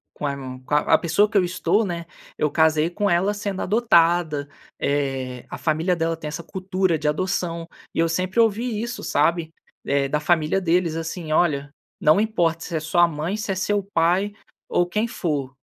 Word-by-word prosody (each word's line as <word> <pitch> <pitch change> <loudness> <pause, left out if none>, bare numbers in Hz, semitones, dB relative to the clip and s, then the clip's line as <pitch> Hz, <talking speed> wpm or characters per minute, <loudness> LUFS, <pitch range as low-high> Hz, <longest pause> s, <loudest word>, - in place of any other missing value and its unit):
com 150 - -4
aimon 135 -2 -5
com 145 - -1
a 150 - +3
a - - +6
pessoa 200 +5 +2
que 215 - -2
eu 185 - +3
estou, 185 +4 +1
né, 170 -3 -4 0.3
eu 150 - 0
casei 160 +1 +3
com 205 +3 0
ela 185 +3 +2
sendo 200 -2 -4
adotada, 170 -8 +2 0.3
eh, 135 -3 -2
a - - -6
família 165 +3 +1
dela 165 0 -1
tem 155 -1 -8
essa 165 +3 -5
cultura 185 -1 -1
de 150 - -3
adoção. 170 +1 -1 0.3
E - - -4
eu 165 - +3
sempre 185 +6 0
ouvi 225 0 +1
isso, 235 +1 -5
sabe, 160 +2 +1 0.3
eh, 140 0 +1
da 150 +2 0
família 160 +3 +2
deles, 170 -2 +1
assim: 165 0 -4
"Olha, 145 -4 +1 0.3
não 155 +6 +5
importa 170 -7 +1
se 170 - -6
é - - -1
sua 175 +2 +3
mãe, 165 +4 -3
se 210 -2 -3
é - - -1
seu 205 +1 0
pai 180 +5 +2 0.4
ou 175 - +2
quem 210 +5 0
for. 145 - -3
170 Hz, 190 wpm, -23 LUFS, 155-190 Hz, 0.4 s, a